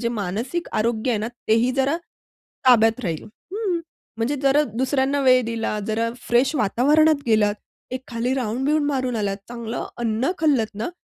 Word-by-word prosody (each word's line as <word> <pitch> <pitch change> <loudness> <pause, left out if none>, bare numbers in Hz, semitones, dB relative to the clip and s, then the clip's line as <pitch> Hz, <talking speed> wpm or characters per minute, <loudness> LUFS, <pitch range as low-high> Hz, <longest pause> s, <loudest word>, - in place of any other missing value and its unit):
जे 235 - 0
मानसिक 230 - -3
आरोग्य 225 +2 0
आहे 225 - +1
ना 215 +2 -2 0.2
तेही 230 +3 +4
जरा 275 +4 +2 0.7
ताब्यात 225 -1 +5
राहील 165 -4 -3
हं. 365 - -4 0.4
म्हणजे 240 +6 0
जरा 275 +2 +4
दुसऱ्यांना 265 +3 +1
वेळ 255 -1 +5
दिला, 225 -2 -2
जरा 225 +1 0 0.2
फ्रेश 255 +5 +3
वातावरणात 285 +7 +3
गेलात, 215 -3 +3 0.4
एक 255 0 -3
खाली 245 +2 -1
राउंड-बिउंड 270 +5 0
मारून 260 -4 -1
आलात, 200 -2 -1
चांगलं 235 -1 -5
अन्न 235 +6 0
खाल्लत 270 -9 +1
ना, 215 +8 -3
245 Hz, 150 wpm, -23 LUFS, 220-275 Hz, 0.7 s, ताब्यात